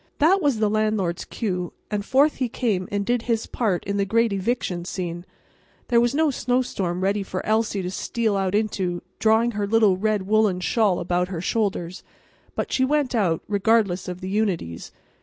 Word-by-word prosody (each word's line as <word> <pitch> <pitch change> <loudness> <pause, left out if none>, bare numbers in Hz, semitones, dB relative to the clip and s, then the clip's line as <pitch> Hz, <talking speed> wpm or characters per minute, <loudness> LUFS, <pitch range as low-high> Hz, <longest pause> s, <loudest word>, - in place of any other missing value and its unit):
That 370 +6 +4
was 285 -6 +2
the 215 0 +2
landlord's 210 -5 0
cue; 180 -6 -3 0.2
and 205 -1 -1
forth 280 +7 +3
he 255 -2 -1
came 205 -7 -1
and 200 0 -1
did 240 +1 +1
his 225 -1 +1
part 205 -7 -1
in 200 +1 -2
the 200 - +2
great 225 +2 +2
eviction 195 -3 -1
scene. 175 -1 -5 0.6
There 235 -1 +5
was 240 +3 +1
no 315 -1 +3
snowstorm 245 -9 -1
ready 200 +2 +1
for 185 -1 -5
Elsie 215 -3 0
to 180 - -3
steal 220 +2 -1
out 195 0 0
into, 190 -5 -1 0.2
drawing 225 +2 +3
her 205 -2 -2
little 215 -3 +4
red 210 0 0
woollen 210 -2 +2
shawl 200 0 +1
about 180 +1 0
her 180 -3 -5
shoulders, 185 -2 -2 0.5
but - - -3
she 260 - +2
went 285 -1 +1
out, 185 -8 +1
regardless 200 -2 +2
of 180 +1 -6
the 185 - -4
unities. 190 - -2
205 Hz, 180 wpm, -23 LUFS, 185-230 Hz, 0.6 s, There